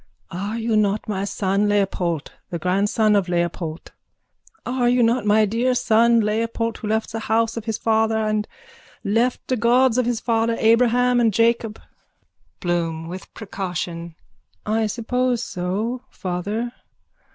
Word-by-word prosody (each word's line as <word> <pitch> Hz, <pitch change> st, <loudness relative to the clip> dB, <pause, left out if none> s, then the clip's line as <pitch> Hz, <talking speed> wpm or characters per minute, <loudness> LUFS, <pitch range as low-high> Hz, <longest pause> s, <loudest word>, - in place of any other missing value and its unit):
_ -, -, -7 dB
Are 205 Hz, +5 st, -3 dB
you 225 Hz, -1 st, 0 dB
not 210 Hz, 0 st, +1 dB
my 200 Hz, -2 st, -2 dB
son 200 Hz, +1 st, 0 dB
Leopold, 185 Hz, -6 st, 0 dB, 0.2 s
the 170 Hz, -, -3 dB
grandson 205 Hz, +5 st, +2 dB
of 195 Hz, -3 st, +1 dB
Leopold? 170 Hz, -2 st, -2 dB, 0.7 s
Are 250 Hz, -1 st, +1 dB
you 245 Hz, 0 st, +3 dB
not 230 Hz, -1 st, +1 dB
my 215 Hz, +1 st, +5 dB
dear 235 Hz, +5 st, 0 dB
son 235 Hz, 0 st, +4 dB
Leopold 230 Hz, +2 st, -1 dB
who 215 Hz, -, -5 dB
left 220 Hz, +1 st, -1 dB
the 225 Hz, -, -3 dB
house 225 Hz, +1 st, 0 dB
of 230 Hz, -2 st, -5 dB
his 225 Hz, -2 st, -2 dB
father 220 Hz, 0 st, +1 dB
and 215 Hz, -1 st, 0 dB, 0.6 s
left 230 Hz, +5 st, 0 dB
the 255 Hz, -, 0 dB
god 245 Hz, +2 st, +3 dB
of 245 Hz, -, +1 dB
his 240 Hz, -2 st, 0 dB
fathers 230 Hz, -1 st, 0 dB
Abraham 245 Hz, +2 st, +4 dB
and 230 Hz, -2 st, +3 dB
Jacob? 230 Hz, 0 st, +1 dB, 0.8 s
BLOOM: 165 Hz, -2 st, -2 dB
(With 185 Hz, +1 st, -8 dB
precaution.) 175 Hz, -5 st, -5 dB, 0.5 s
I 220 Hz, +1 st, +1 dB
suppose 245 Hz, +2 st, -1 dB
so, 205 Hz, +7 st, -3 dB
father. 205 Hz, +6 st, -3 dB
220 Hz, 145 wpm, -22 LUFS, 195-230 Hz, 0.8 s, my